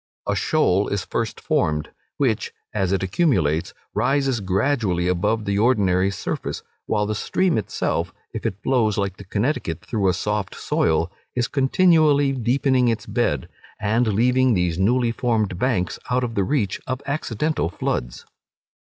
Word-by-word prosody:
A - - +1
shoal 95 +3 +2
is 100 -3 -2
first 115 -1 -3
formed, 75 -1 0 0.3
which, 125 -7 0 0.2
as 95 -3 0
it 95 -1 +1
accumulates, 90 - +1 0.2
rises 135 -3 +1
gradually 95 -2 0
above 105 +5 0
the 100 0 0
ordinary 100 -5 +3
surface, 95 - -4 0.2
while 105 -1 +1
the 105 - -1
stream 180 - +1
itself, 110 - -1 0.2
if - - -5
it 95 - -3
flows 115 -6 +2
like 100 -2 -1
the - - -10
Connecticut 105 - -2
through 100 -4 +1
a 90 - +1
soft 105 0 -2
soil, 80 +2 0 0.2
is 125 -1 +1
continually 145 0 +4
deepening 130 0 +2
its 115 -1 0
bed, 100 - 0 0.3
and 110 +3 +1
leaving 125 +3 +3
these 90 -2 0
newly 120 +4 +2
formed 110 -6 0
banks 110 -9 0
out 125 0 +1
of 120 -2 -2
the 100 - +1
reach 105 -5 -1
of 130 +1 -3
accidental 145 - -1
floods. - - -3
110 Hz, 150 wpm, -22 LUFS, 95-130 Hz, 0.3 s, continually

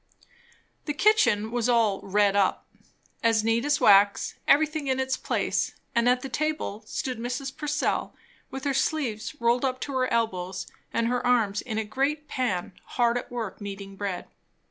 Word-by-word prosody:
The 295 - -2
kitchen 290 - +3
was 240 0 0
all 225 -5 +3
"redd 200 0 +2
up," 195 -2 +1 0.6
as 225 -2 +3
neat 225 +2 +1
as 290 0 +2
wax; 200 0 +5
everything 305 0 +3
in 260 0 +1
its 265 0 0
place; - - -1 0.2
and 235 0 +3
at 250 0 +2
the - - -3
table 305 -6 -2
stood 255 -3 -3
Mrs. 265 +3 -4
Purcell 295 0 -1 0.3
with 265 0 -7
her 280 - 0
sleeves 265 -4 -1
rolled 235 +2 +2
up 255 -1 0
to 285 - -4
her 255 0 +1
elbows 190 -5 -1 0.3
and 230 - 0
her 245 +1 0
arms 225 -5 +2
in 220 -4 -5
a 220 - 0
great 280 +7 -1
pan, 205 -12 -2 0.2
hard 240 -1 +3
at 245 - -3
work 225 -5 -5
kneading 195 -1 -7
bread. 195 -2 -4
240 Hz, 165 wpm, -26 LUFS, 210-270 Hz, 0.6 s, wax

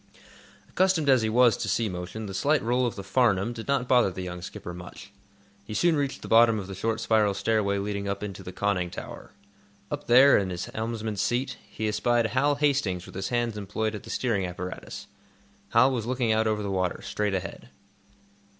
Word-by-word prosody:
Accustomed 185 -6 +1
as 130 -3 +5
he 110 - 0
was 120 +1 +5
to 105 - -3
sea 110 +4 +1
motion, 90 +3 -6
the 95 - -6
slight 145 +10 +1
roll 125 +2 +1
of 120 - -4
the 100 - -7
"Farnum" 115 -2 +2
did 115 -1 -8
not 140 -3 0
bother 125 -5 +4
the 95 0 -6
young 90 -1 -6
skipper 90 -1 -7
much. 90 +3 -11 0.5
He 105 +1 -7
soon 170 +4 +3
reached 140 -2 -2
the - - -7
bottom 115 0 +5
of 100 - -4
the 95 - -7
short 110 +4 -2
spiral 110 -3 +2
stairway 100 0 +1
leading 100 0 -3
up 100 +1 -3
into 100 -3 -6
the 90 - -8
conning 95 -2 -1
tower. - - -9 0.6
Up - - -5
there, 130 +2 +7
in 95 -2 -2
the 90 - -4 0.2
helmsman's 110 -2 -3
seat, 125 +5 -1
he 110 - -3
espied 120 +2 +1
Hal 135 +6 +2
Hastings 135 -12 0
with - - -12
his 95 0 -4
hands 120 -2 -1
employed 105 +2 -2
at 105 - -6
the - - -13
steering 115 -6 0
apparatus. 90 +1 -7 0.6
Hal 130 +4 +5
was 120 -3 -3
looking 125 -2 0
out 110 0 +2
over 105 -1 0
the 100 - -3
water, 95 -2 -1
straight 105 -2 -1
ahead. 95 0 -6
110 Hz, 205 wpm, -27 LUFS, 95-120 Hz, 0.6 s, there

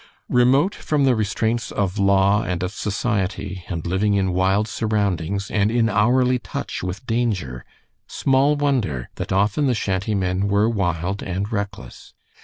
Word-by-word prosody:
Remote 135 +10 +4
from 150 -2 -1
the 130 -2 +4
restraints 110 +2 -1
of 100 0 -2
law 100 +1 +3
and 90 -3 -3
of 90 - -2
society, 100 -4 -2
and 85 -4 -4
living 95 +4 +1
in 95 -2 +1
wild 95 +3 +2
surroundings 100 -4 -1
and 105 -1 +2
in 115 -1 +2
hourly 125 +5 +3
touch - - -5
with 90 +7 -5
danger, 105 - -2 0.4
small 135 +2 +2
wonder 125 - -1
that - - -5
often 105 +9 +2
the 125 - +2
shanty 95 0 -1
men 95 +1 0
were 100 +2 +2
wild 95 -3 -1
and 95 +3 -3
reckless. 100 - -6
100 Hz, 150 wpm, -22 LUFS, 95-115 Hz, 0.4 s, Remote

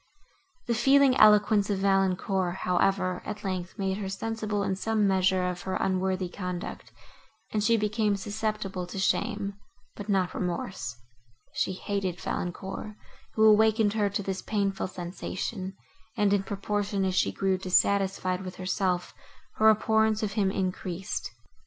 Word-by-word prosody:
The 235 - 0
feeling 270 +3 +5
eloquence 210 -1 +5
of 200 - +1
Valancourt, 190 -1 +1
however, 185 0 +1
at 210 0 -6
length, 185 -2 -4
made 190 -1 -1
her 195 -2 -3
sensible 215 0 -2
in 195 -1 0
some 215 +1 +1
measure 185 -1 +2
of 180 -1 -4
her 190 - -3
unworthy 190 -1 0
conduct, 180 -1 -6 0.6
and 210 -1 +1
she 230 +1 +4
became 210 0 +1
susceptible 200 -2 -3
to 185 - -8
shame, 200 +1 0 0.4
but 205 0 -8
not 190 -3 +1
remorse: 170 -9 -3 0.6
she 190 - 0
hated 190 -2 -3
Valancourt, 190 +4 -4 0.4
who 220 - +4
awakened 220 0 +5
her 210 -2 +1
to 200 +1 -2
this 190 0 -3
painful 200 -3 -1
sensation, 185 +2 -5 0.4
and, 205 -1 +3
in 200 - +3
proportion 200 0 -2
as 185 - 0
she - - +2
grew 190 -1 0
dissatisfied 190 0 +1
with 185 -1 -7
herself, 185 -1 -1 0.4
her 220 0 +6
abhorrence 220 0 +3
of 210 - -1
him 205 -3 +2
increased. 185 0 -3
195 Hz, 140 wpm, -28 LUFS, 185-210 Hz, 0.6 s, her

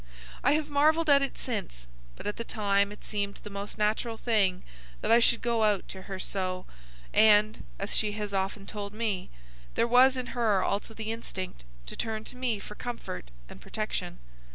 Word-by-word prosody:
I 280 - +5
have 305 0 +1
marvelled 310 +2 +4
at 280 0 +7
it 275 - -2
since, 200 - -4 0.3
but - - -10
at 205 - -2
the 230 - -3
time 200 -3 +1
it 210 - -11
seemed 200 -1 -2
the 210 - -8
most 200 +2 -6
natural 220 +2 0
thing 200 -7 +2 0.4
that - - +1
I 230 - +8
should 235 0 +4
go 235 -1 +1
out 205 -3 +2
to 190 - -6
her 190 +1 -6
so, 185 -1 -2 0.5
and, 215 0 +5
as 195 - -3
she 210 -1 +1
has 210 -1 -4
often 195 +1 -1
told 205 -1 -5
me, 215 -5 -1 0.5
there 235 - +3
was 255 +2 +6
in 250 -1 -3
her 215 -6 +2
also 210 +2 -2
the 220 0 -3
instinct 185 - -6 0.2
to - - -7
turn 220 -1 -2
to 250 - -9
me 250 -3 0
for 200 - -8
comfort 235 - -6 0.2
and - - -12
protection. - - -3
210 Hz, 190 wpm, -29 LUFS, 200-235 Hz, 0.5 s, I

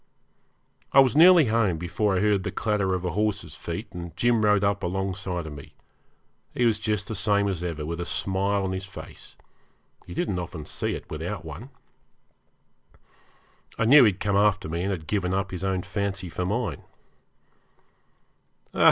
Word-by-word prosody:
I 135 - +8
was 135 -1 +5
nearly 170 0 +8
home 110 -6 +1
before 90 +4 0
I - - +1
heard 105 -2 +2
the - - -3
clatter 100 -4 0
of 90 0 -4
a 90 - -1
horse's 105 0 -1
feet, - - -5
and 85 -1 -8
Jim 120 -2 +2
rode 105 -1 +3
up 100 0 +1
alongside 90 -1 -3
of 80 - -7
me. 70 - -12 0.8
He 125 - +2
was 110 -2 +2
just 105 -2 -1
the - - -4
same 100 -2 +1
as 90 -4 -3
ever, 80 -4 -4
with 85 +2 -4
a - - -3
smile 100 +2 0
on 95 - -2
his 95 0 -4
face. 95 - -11 0.7
You 90 - -8
didn't 95 -2 -1
often 85 -3 -6
see - - -3
it - - -9
without - - -5
one. 100 - -8 2.1
I 115 - +1
knew 140 +4 +8
he 110 - +6
had 95 - -12
come 100 -2 0
after 100 -3 +2
me, 85 +2 -3
and 95 - -1
had 85 -5 -4
given 95 0 -1
up 95 -1 -2
his 90 0 -5
own 95 -2 -1
fancy 100 -3 -3
for 90 +2 -3
mine. 105 -5 -2
95 Hz, 180 wpm, -25 LUFS, 90-105 Hz, 2.1 s, I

